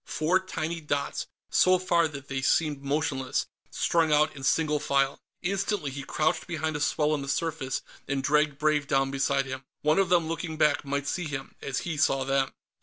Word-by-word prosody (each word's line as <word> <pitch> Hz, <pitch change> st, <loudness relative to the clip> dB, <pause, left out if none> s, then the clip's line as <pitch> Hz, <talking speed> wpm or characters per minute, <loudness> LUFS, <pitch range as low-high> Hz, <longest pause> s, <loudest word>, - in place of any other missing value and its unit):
Four 170 Hz, +4 st, +2 dB
tiny 170 Hz, -3 st, -4 dB
dots, 145 Hz, -2 st, -2 dB, 0.2 s
so 185 Hz, 0 st, +5 dB
far 170 Hz, -2 st, +2 dB
that 140 Hz, -2 st, -9 dB
they 135 Hz, -1 st, -3 dB
seemed 145 Hz, +1 st, +1 dB
motionless, 140 Hz, -2 st, -1 dB, 0.2 s
strung 165 Hz, -2 st, +1 dB
out 150 Hz, +1 st, +3 dB
in 140 Hz, -, -9 dB
single 150 Hz, +2 st, +2 dB
file. 140 Hz, -1 st, +1 dB, 0.2 s
Instantly, 195 Hz, -4 st, -1 dB
he 140 Hz, +1 st, -5 dB
crouched 155 Hz, +4 st, 0 dB
behind 160 Hz, -2 st, -2 dB
a -, -, -2 dB
swell 150 Hz, +1 st, +1 dB
in 150 Hz, -, -1 dB
the 140 Hz, -, -6 dB
surface 150 Hz, -4 st, -1 dB, 0.2 s
and 135 Hz, -1 st, -1 dB
dragged 150 Hz, 0 st, +2 dB
Brave 150 Hz, -1 st, +1 dB
down 135 Hz, -1 st, +2 dB
beside 135 Hz, 0 st, +1 dB
him. 130 Hz, 0 st, -6 dB, 0.2 s
One 155 Hz, +5 st, +3 dB
of 195 Hz, -3 st, +2 dB
them, 170 Hz, -3 st, +3 dB
looking 165 Hz, -1 st, -4 dB
back, 150 Hz, -2 st, +3 dB
might 140 Hz, 0 st, -2 dB
see 180 Hz, +3 st, -2 dB
him, 145 Hz, -3 st, -5 dB
as 135 Hz, -1 st, -2 dB
he 165 Hz, -3 st, -3 dB
saw 135 Hz, -1 st, +2 dB
them. 135 Hz, 0 st, +1 dB
150 Hz, 190 wpm, -28 LUFS, 140-160 Hz, 0.2 s, so